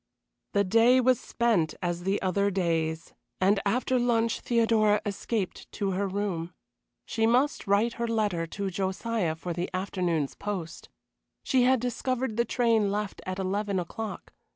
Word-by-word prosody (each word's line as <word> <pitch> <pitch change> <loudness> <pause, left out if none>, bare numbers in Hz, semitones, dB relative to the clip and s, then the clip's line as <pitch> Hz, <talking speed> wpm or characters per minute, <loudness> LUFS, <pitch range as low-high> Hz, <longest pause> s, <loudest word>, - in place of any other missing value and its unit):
The 200 - +3
day 230 +6 +5
was 255 -1 +3
spent 215 -10 +1
as 175 -1 -3
the 195 +1 +1
other 200 +2 +2
days, 165 -4 -1 0.3
and 195 +2 +3
after 250 +4 +1
lunch 230 -2 +1
Theodora 225 -3 +3
escaped 200 -1 -3
to 200 -2 -1
her 195 +2 0
room. 185 -4 -3 0.5
She 225 -1 +1
must 250 0 +2
write 210 +4 +3
her 235 - +1
letter 205 -7 0
to 195 +3 -4
Josiah 190 -1 -1
for 170 +2 -5
the 175 +2 -3
afternoon's 180 -6 -1
post. 185 -6 -5 0.5
She 255 -2 +3
had 260 0 +4
discovered 250 0 -2
the 235 +1 +2
train 225 -4 +2
left 210 0 -3
at 185 0 -3
eleven 195 +1 -1
o'clock. 215 +5 -6
200 Hz, 150 wpm, -28 LUFS, 185-230 Hz, 0.5 s, day